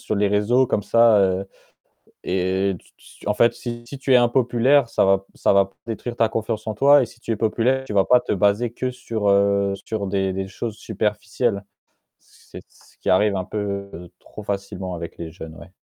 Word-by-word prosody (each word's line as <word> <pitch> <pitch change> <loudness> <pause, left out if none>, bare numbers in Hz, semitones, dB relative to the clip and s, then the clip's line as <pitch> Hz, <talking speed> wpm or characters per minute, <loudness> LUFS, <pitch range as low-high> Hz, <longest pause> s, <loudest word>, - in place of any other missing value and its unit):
sur 110 - -3
les 100 0 +2
réseaux 115 +6 +2
comme 105 - -1
ça, 115 0 +5
heu, 95 0 0 0.8
et 95 +1 0
tu - - -25
tu - - -14
en 105 - +2
fait 120 - +4
si 120 -1 -7
si 140 0 -9
tu 135 - -2
es - - +8
impopulaire, 120 +1 +3
ça - - +2
va 95 0 +2
ça - - +2
va 100 0 +5
pas 95 - -22
détruire 115 +1 -5
ta 115 -1 +2
confiance 110 -1 -3
en 110 - -1
toi 140 +5 +6
et - - -2
si 120 +1 -18
tu - - -13
es - - +1
populaire, 120 +4 +1
tu - - -6
vas 95 -2 +3
pas 125 - +5
te - - -4
baser 105 +4 +1
que 130 - -2
sur 115 -5 -2
heu, 100 0 +2
sur 110 -3 -3
des 95 -1 -1
des 95 0 -4
choses 105 +3 -5
superficielles. 105 0 -2 0.6
C'est - - -15
ce - - -24
qui - - 0
arrive 100 +2 +3
un 95 - -2
peu 100 -3 -5
trop 105 - -11
facilement 100 -2 -4
avec 85 -1 -8
les 85 -1 -6
jeunes, 80 -2 -10
ouais. 95 - -14
105 Hz, 210 wpm, -22 LUFS, 95-120 Hz, 0.8 s, es